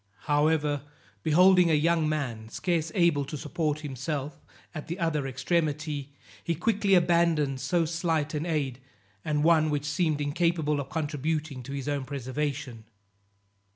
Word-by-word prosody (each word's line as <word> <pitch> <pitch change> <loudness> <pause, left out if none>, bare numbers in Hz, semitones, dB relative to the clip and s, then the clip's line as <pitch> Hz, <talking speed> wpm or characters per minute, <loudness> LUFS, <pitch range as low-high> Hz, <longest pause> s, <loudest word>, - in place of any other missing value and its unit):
However, 150 -1 +1 0.4
beholding 180 - +5
a 160 - +4
young 160 +1 +2
man 120 -8 -3
scarce 165 +4 -1
able 170 -6 +3
to 150 - -6
support 150 0 -2
himself 145 +1 -4 0.3
at 155 -3 -7
the 170 - -4
other 160 -6 0
extremity, 145 +1 -1 0.3
he 170 - -1
quickly 200 +2 +2
abandoned 170 -6 +2
so 165 +5 +1
slight 165 -2 -1
an 155 +3 -2
aid, 140 -6 -1 0.4
and 150 -1 0
one 160 -1 +4
which 145 -1 -1
seemed 150 +1 0
incapable 150 0 0
of 140 -1 -5
contributing 155 -2 -2
to 135 +3 -8
his 140 -1 -4 0.2
preservation. 135 -3 -4
150 Hz, 135 wpm, -28 LUFS, 145-165 Hz, 0.4 s, beholding